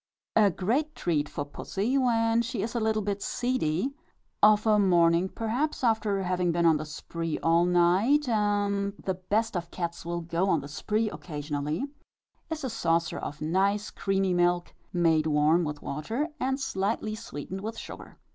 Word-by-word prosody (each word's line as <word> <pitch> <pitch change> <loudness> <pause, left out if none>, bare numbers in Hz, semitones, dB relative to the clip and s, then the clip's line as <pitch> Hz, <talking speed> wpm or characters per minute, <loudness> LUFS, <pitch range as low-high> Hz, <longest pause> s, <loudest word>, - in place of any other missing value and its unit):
A 215 -2 +6
great 245 - -1
treat 150 -4 0
for 145 - -4
pussy, 200 - -2
when 230 -3 +3
she 235 -4 -3
is 225 - -3
a 240 - 0
little 220 -1 +1
bit 200 0 -2
seedy 245 - -1 0.5
of 210 0 +6
a 215 -1 +4
morning, 175 -1 +4
perhaps, 245 +9 -2
after 215 -4 +1
having 180 -1 +1
been 170 0 +1
on 160 -2 +5
the 155 - -5
spree 165 +1 -4
all 165 +1 +4
night, 185 +12 +3
and 205 -2 +1
the 190 - -2
best 205 +4 -1
of 170 -1 -3
cats 170 -1 -4
will 170 0 -3
go 170 +3 0
on 165 - +3
the 140 - -8
spree 215 +9 -1
occasionally 150 - -3 0.6
is 315 -2 -4
a 260 - -1
saucer 165 -7 0
of 150 +2 -6
nice 200 +6 +1
creamy 195 -1 0
milk, 175 0 +1 0.2
made 165 -3 +2
warm 155 +3 +3
with 150 -2 -5
water, 225 - -2
and 265 +1 0
slightly 215 -4 -1
sweetened 190 -4 -6
with 220 +2 -5
sugar. - - -9
195 Hz, 165 wpm, -28 LUFS, 170-220 Hz, 0.6 s, A